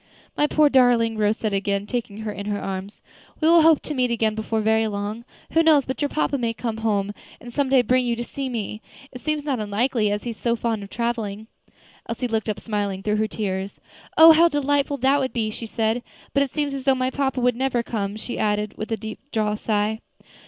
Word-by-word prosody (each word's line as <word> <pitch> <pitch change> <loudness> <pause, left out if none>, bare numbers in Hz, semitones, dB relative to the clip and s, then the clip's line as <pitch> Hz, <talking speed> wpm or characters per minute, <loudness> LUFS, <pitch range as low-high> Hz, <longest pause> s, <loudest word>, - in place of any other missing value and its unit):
"My 295 - +2
poor 305 0 +4
darling!" 245 -4 +4
Rose 210 +1 +2
said, 215 -2 -2
again 200 0 -1
taking 220 -2 -4
her 220 -1 -3
in 200 0 -6
her 205 -1 -1
arms, 195 +1 -6 0.4
"we 315 - +2
will 335 0 +7
hope 315 -1 +5
to 300 - -4
meet 255 -3 +1
again 225 -2 +1
before 220 +1 -2
very 220 +1 +2
long. 210 +3 -4 0.3
Who 325 - +4
knows 310 -5 +5
but 260 - -4
your 290 - +1
papa 285 -2 0
may 230 -1 -1
come 225 -2 -3
home, 205 -2 0 0.3
and 240 0 -11
some 280 0 0
day 260 -2 +5
bring 255 +1 +2
you 235 - +1
to 240 - -4
see 270 +2 -5
me. 215 -2 -4 0.3
It 250 - -10
seems 305 0 -1
not 275 -5 -1
unlikely, 215 +2 0
as 205 0 -2
he 240 - -3
is 225 - -10
so 235 -1 0
fond 225 -2 -2
of 200 - -9
traveling." 225 -3 -3 0.6
Elsie 235 +2 -2
looked 225 -1 -1
up, 210 - -2
smiling 205 -3 -3
through 210 +1 +1
her 215 0 +1
tears, 195 -2 -4 0.4
"Oh! 325 +1 +10
how 330 +2 +6
delightful 285 -2 0
that 270 +2 +3
would 260 -1 -2
be," 220 -3 -1
she 225 +1 -7
said. 225 +2 0 0.3
"But 280 - +3
it 280 - +1
seems 290 0 -2
as 270 -1 -5
though 270 -1 +4
my 255 0 -1
papa 270 -1 -1
would 250 -1 +2
never 250 -1 0
come," 205 -3 -3
she 220 +3 -6
added, 210 0 0
with 215 - -5
a 225 - 0
deep 220 +1 -7
drawn 210 -1 0
sigh. 215 0 -1
230 Hz, 230 wpm, -23 LUFS, 210-265 Hz, 0.6 s, Oh